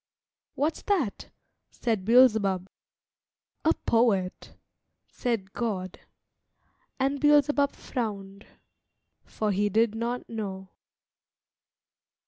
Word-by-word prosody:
"What's 305 +3 -1
that?" 340 - -1 0.4
said 220 -6 -2
Beelzebub. 215 -6 +4 1.0
"A - - +4
poet," 210 -6 +1 0.5
said 220 -6 -3
God. 190 -6 -3 1.0
And 275 +2 0
Beelzebub 290 -1 +3
frowned, 200 -4 -5 0.8
for 215 -1 -2
he 205 +2 +1
did 220 +2 +2
not 235 +2 -3
know. 195 -4 -6
225 Hz, 80 wpm, -27 LUFS, 195-250 Hz, 1.0 s, Beelzebub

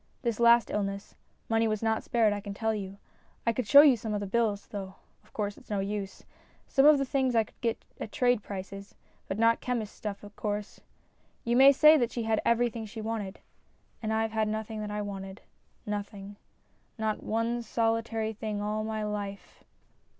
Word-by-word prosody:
This 235 -3 -1
last 235 0 +5
illness, 200 -1 -3 0.3
money 225 0 +2
was 215 0 -2
not 220 0 +1
spared 225 -3 +2
I 205 - -3
can 200 -1 -7
tell 220 +1 0
you. 200 -2 -5 0.5
I 230 - +2
could 245 -2 -3
show 280 +7 +10
you 290 -4 +6
the 210 -2 -3
bills, 210 0 0
though 195 -2 -7 0.3
of - - -25
course 205 -1 -3
it's - - -22
no 205 -2 -1
use. 195 0 -4 0.4
Some 275 +2 +4
of 300 -1 +8
the 275 - 0
things 260 -2 0
I 225 - +5
could - - -22
get 230 -2 -2
at 215 - -6
trade 245 -3 +2
prices, 195 0 -8 0.3
but 190 - -3
not 230 +1 +3
chemist's 235 -4 -3
stuff, 205 -2 -6
of 205 0 -12
course. 210 -1 -4 0.6
You 235 0 0
may 270 +2 +8
say 305 +3 +7
that 240 -4 0
she 235 - -3
had 220 -1 +1
every 235 0 +2
thing 225 -1 -6
she 220 +2 -9
wanted. 215 -3 -4 0.6
And 220 -1 -2
I've 220 0 0
had 220 -1 0
nothing 220 0 -4
that 210 - -4
I 210 0 -3
wanted 195 -1 -7 0.4
nothing. 205 -1 -5 0.6
Not 220 -1 -1
one 230 +2 -1
solitary 225 -1 -1
thing 215 -1 -4
all 210 +1 -2
my 220 0 -3
life." 205 -1 -6
220 Hz, 190 wpm, -29 LUFS, 205-230 Hz, 0.6 s, show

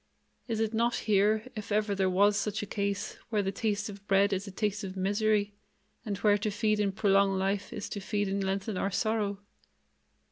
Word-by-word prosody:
Is 225 -2 -2
it 220 0 0
not 235 +1 +2
here, 215 +1 +2
if 215 -1 -6
ever 210 0 +1
there 190 -1 +1
was 200 +3 +4
such 210 +1 -1
a - - -3
case, 200 -1 -3
where 210 -3 +1
the 195 - -1
taste 205 +1 -1
of 200 -1 -10
bread 200 0 +4
is 195 +2 -2
a - - -6
taste 205 +1 -2
of 190 0 -6
misery, 205 +1 +1 0.5
and 205 -4 -3
where 205 0 +3
to 215 - -1
feed 215 +1 +1
and 200 -2 0
prolong 195 -2 +3
life 195 +1 -1
is 210 -3 -5
to 205 - -4
feed 205 +1 -1
and 195 0 -1
lengthen 195 +1 -2
our 195 - 0
sorrow? 210 0 0
205 Hz, 205 wpm, -30 LUFS, 195-215 Hz, 0.5 s, was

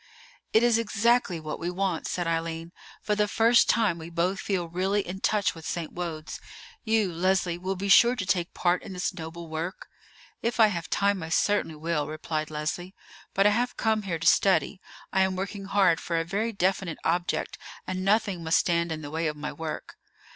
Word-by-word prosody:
"It 220 - +4
is 235 -1 +4
exactly 230 -4 +2
what 155 -1 -5
we 170 - -2
want," 180 -2 -1
said 175 - -2
Eileen; 165 0 -2 0.3
"for 210 - 0
the 210 0 +2
first 230 +3 +4
time 210 -7 +2
we 160 +1 -8
both 175 +3 0
feel 185 -4 -1
really 190 +4 -1
in 185 +2 -5
touch 205 0 +1
with 165 - -11
St. 165 -1 -4
Wode's. 165 -3 -5 0.4
You, 220 -5 +1
Leslie, 180 0 +1
will 190 +2 -2
be 195 +2 -4
sure 235 +5 +7
to 200 - -3
take 175 -2 -1
part 175 0 +2
in - - -8
this 180 +2 -2
noble 170 -1 -7
work?" 160 +4 -5 0.5
"If 235 +1 -2
I 220 -1 +7
have 170 -2 -5
time 200 -1 +1
I 160 - -5
certainly 190 -1 +1
will," 160 -1 -1
replied 155 0 -3
Leslie; 155 +5 -4 0.4
"but 195 - +4
I 210 - +6
have 240 +3 0
come 220 -1 +1
here 185 -5 -3
to 165 - -6
study. 190 +2 +3 0.3
I 190 - +3
am 190 0 +2
working 195 +1 -4
hard 195 -4 +3
for 170 -1 -1
a 165 - -2
very 210 +6 -1
definite 190 -3 0
object, 175 +1 -1 0.3
and 185 0 -3
nothing 200 -3 +1
must 160 +1 +3
stand 170 -1 +1
in 155 -1 -4
the 145 - -7
way 160 +1 -1
of 150 -1 -3
my 150 +1 -5
work." 160 -1 -6
180 Hz, 200 wpm, -27 LUFS, 165-200 Hz, 0.5 s, sure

